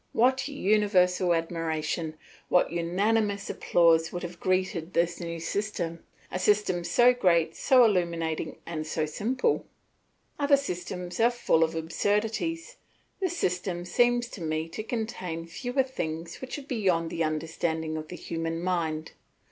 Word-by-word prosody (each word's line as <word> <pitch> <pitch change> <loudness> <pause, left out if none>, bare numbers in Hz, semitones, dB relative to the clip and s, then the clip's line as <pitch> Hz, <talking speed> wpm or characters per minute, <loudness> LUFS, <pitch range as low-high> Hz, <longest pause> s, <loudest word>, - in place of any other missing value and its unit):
What 260 +3 +3
universal 190 -8 +2
admiration, 165 -1 -2 0.3
what 180 - +3
unanimous 200 +4 0
applause 165 -2 +3
would 175 - -5
have 175 0 -7
greeted 185 -2 0
this 170 +1 +1
new 170 -1 -4
system 170 -2 -3 0.3
a 185 - -2
system 185 -3 +2
so 245 +7 +5
great, 170 -8 +2
so 255 -2 +5
illuminating, 170 -6 0
and 155 -2 -4
so 155 0 0
simple. 250 - 0 0.7
Other 285 -1 +5
systems 180 -7 -5
are 230 +1 +6
full 240 -9 +2
of 160 0 -1
absurdities; 220 - -1 0.4
this 365 -3 -1
system 175 - -1
seems 240 +5 +2
to 195 - -9
me 155 0 -1
to 215 - -5
contain 215 -8 -4
fewer 245 +10 -1
things 165 -10 -5
which 260 +2 -5
are 290 - -7
beyond 190 - 0
the 165 - -1
understanding 160 0 -2
of 155 0 -5
the 180 - -7
human 165 -1 -3
mind. 165 -3 -1
180 Hz, 140 wpm, -28 LUFS, 165-220 Hz, 0.7 s, are